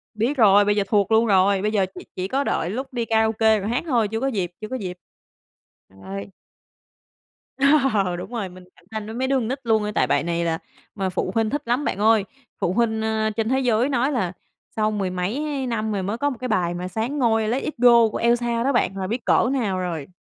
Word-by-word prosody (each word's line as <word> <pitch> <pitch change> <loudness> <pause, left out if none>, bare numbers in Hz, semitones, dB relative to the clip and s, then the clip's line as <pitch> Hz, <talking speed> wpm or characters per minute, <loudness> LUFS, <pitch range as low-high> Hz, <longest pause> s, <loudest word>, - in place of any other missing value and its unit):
Biết 245 +6 0
rồi, 205 -2 +6
bây 205 - +2
giờ 205 - +2
thuộc 205 -1 +1
luôn 225 +1 +5
rồi, 195 -1 +3
bây 210 +1 0
giờ 200 -3 +2
chỉ - - -9
chỉ 185 0 -3
có 275 +7 0
đợi 170 - -1
lúc 260 +6 -5
đi 235 -2 -1
karaoke 220 -1 +2
rồi 200 - -3
hát 240 +3 -1
thôi, 235 -6 +2
chưa 225 +2 -3
có 270 - -1
dịp, 190 -9 -2
chưa 215 - -5
có 260 - -5
dịp. 185 -7 -5 0.9
Rồi. 95 +1 -8 1.7
Ờ, 190 -4 +1
đúng 180 - -7
rồi, 210 -5 -3
mình 180 0 -13
cạnh - - -24
tranh 220 -1 -4
với 220 +2 -7
mấy 260 +1 -1
đứa 275 - +1
con 245 -4 0
nít 265 +3 -3
luôn, 220 -3 +1
tại - - +2
bài - - +1
này 170 0 -1
là 165 -1 0 0.4
mà 190 -2 -1
phụ 185 0 -2
huynh 225 -1 +2
thích 290 +4 -2
lắm, 245 +5 0
bạn - - -1
ơi. 215 -1 +4 0.3
Phụ 175 - 0
huynh, 220 -1 +1
ơ, 220 0 0
trên 225 0 -1
thế 265 +1 +2
giới 245 0 +2
nói 265 +1 +1
là 195 -10 -1 0.4
sau 215 -1 +1
mười 200 -3 -1
mấy 260 +10 -2
năm 220 -2 -2
rồi 200 -2 -2
mới 205 +4 -2
có 285 +3 0
một 255 - -6
cái 255 - -3
bài 175 -6 0
mà 180 +1 -4
soán 225 +9 -3
ngôi 225 -3 +2
"Let 245 +5 -1
It 305 - -4
Go" 235 -1 +6
của - - -3
Elsa 235 0 +1
đó 275 +1 +1
bạn, 195 -5 +1
là 190 -1 -3
biết 235 +3 -3
cỡ 240 - +3
nào 210 -9 -1
rồi. 165 -6 -4
220 Hz, 245 wpm, -23 LUFS, 190-240 Hz, 1.7 s, rồi